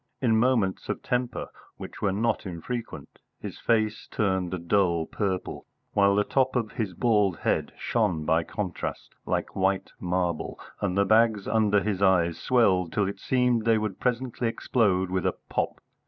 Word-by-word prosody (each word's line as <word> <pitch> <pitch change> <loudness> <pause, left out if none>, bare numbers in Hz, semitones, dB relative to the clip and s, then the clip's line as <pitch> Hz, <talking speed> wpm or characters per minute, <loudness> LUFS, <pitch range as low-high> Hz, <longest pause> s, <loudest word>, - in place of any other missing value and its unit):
In 120 -5 +2
moments 110 -5 +1
of - - -3
temper, 125 0 -2 0.3
which - - -9
were 100 - +2
not 105 +1 0
infrequent, 110 +7 -6 0.2
his - - -7
face 110 -2 0
turned 95 -4 0
a 95 - -2
dull 85 -1 +1
purple, 95 -1 -3 0.3
while 100 -1 +4
the 105 - +3
top 130 +3 +1
of 115 -3 0
his 100 -6 -3
bald 105 -7 +2
head - - 0
shone 90 -10 0
by 80 +2 +3
contrast 90 +1 -5
like - - -2
white 95 0 0
marble, 90 -2 -2 0.2
and 100 -2 -1
the 100 - +4
bags 110 -1 +3
under 105 -2 +2
his 100 -3 -2
eyes 90 -4 +3
swelled 95 -9 +2
till 100 -2 +1
it 100 0 -5
seemed 125 -2 +1
they 115 0 +3
would 105 -3 -3
presently 125 -1 -1
explode 100 -6 +1
with 95 -2 0
a - - 0
pop. - - -1
100 Hz, 165 wpm, -27 LUFS, 95-115 Hz, 0.3 s, while